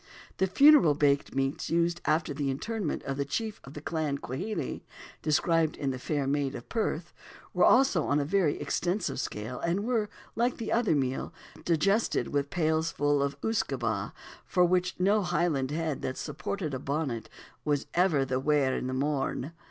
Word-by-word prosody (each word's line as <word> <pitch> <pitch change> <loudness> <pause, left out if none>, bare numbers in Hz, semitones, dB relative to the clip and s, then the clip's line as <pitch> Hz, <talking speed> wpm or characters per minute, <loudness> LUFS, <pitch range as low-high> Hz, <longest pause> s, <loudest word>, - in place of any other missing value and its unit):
The 190 - +2
funeral 275 - +6
baked 140 -2 +1
meats 135 +1 -1
used 170 +1 +1
after 155 -1 +1
the 140 -1 -2
interment 200 +6 -3
of 135 0 -3
the 140 - +1
chief 215 +10 -3
of 135 - -12
the 150 - -6
Clan 155 -3 -1
Quhele 180 - -4 0.4
(described 160 +1 +2
in 135 -2 -1
The 130 - -5
Fair 145 +2 -1
Maid 140 0 0
of - - -8
Perth) 180 -7 -2 0.4
were 180 - +3
also 250 - +4
on 145 - +2
a 145 - 0
very 170 -2 +1
extensive 180 -4 -1
scale, 120 0 -4
and 175 +4 0
were, 225 -4 0 0.3
like 240 +2 +1
the 230 - -4
other 225 -9 +2
meal, 135 -2 -1 0.3
"digested" 195 +7 +1
with 140 -1 -1
pailfuls 155 -3 +1
of 140 0 -3
usquebaugh, 225 0 -1 0.3
for 180 -2 +3
which 180 +1 +1
no 200 +4 +3
Highland 155 -8 0
head 155 -1 -2
that 130 - -3
supported 155 +2 -4
a 130 - -2
bonnet 135 -5 -3 0.3
was 145 -2 0
ever 170 -6 +3
"the 130 -1 -1
waur 140 -1 +2
i' - - -1
th' - - -5
morn." 140 +1 -1
155 Hz, 170 wpm, -29 LUFS, 140-180 Hz, 0.4 s, funeral